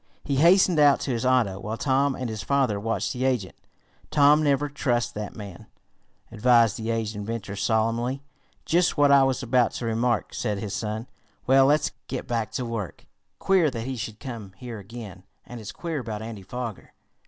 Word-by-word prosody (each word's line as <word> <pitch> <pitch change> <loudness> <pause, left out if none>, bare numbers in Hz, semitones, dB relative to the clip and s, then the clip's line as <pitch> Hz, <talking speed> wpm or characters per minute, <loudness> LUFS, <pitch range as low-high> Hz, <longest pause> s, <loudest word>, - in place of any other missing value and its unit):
He 140 -2 -1
hastened 175 +2 +5
out 145 -2 +6
to 135 - -2
his 120 +1 -1
auto, 115 -7 +2
while 110 +3 -4
Tom 135 +1 +1
and 130 - -4
his 110 -2 -5
father 130 -7 +1
watched 115 +2 -2
the 125 - -3
agent. 125 -8 0 0.6
"Tom, 150 +1 +5
never 145 -1 +2
trust 125 -4 -1
that 105 -1 -6
man," 100 -5 -10 0.6
advised 115 -1 +4
the 110 0 -4
aged 110 -1 -2
inventor 105 -1 -5
solemnly. 115 +5 0 0.4
"Just 175 +1 +2
what 145 -1 +5
I 140 -1 +7
was 135 0 +1
about 125 -1 +2
to 120 - -4
remark," 115 0 0
said 105 -4 -2
his 100 0 -5
son. 110 +2 -3 0.4
"Well, 135 +1 +5
let's 150 +1 +2 0.2
get 130 - -5
back 115 -2 -2
to 125 - -2
work. 115 -6 -5 0.3
Queer 185 -5 +3
that 115 -4 -5
he 130 0 -3
should 110 -2 -6
come 115 -8 -8
here 120 -1 -7
again, 100 -2 -9 0.2
and 120 -2 -9
it's 105 - -7
queer 165 -3 -4
about 110 -3 -5
Andy 110 -3 -7
Foger." 115 +2 -7
120 Hz, 185 wpm, -25 LUFS, 110-135 Hz, 0.6 s, I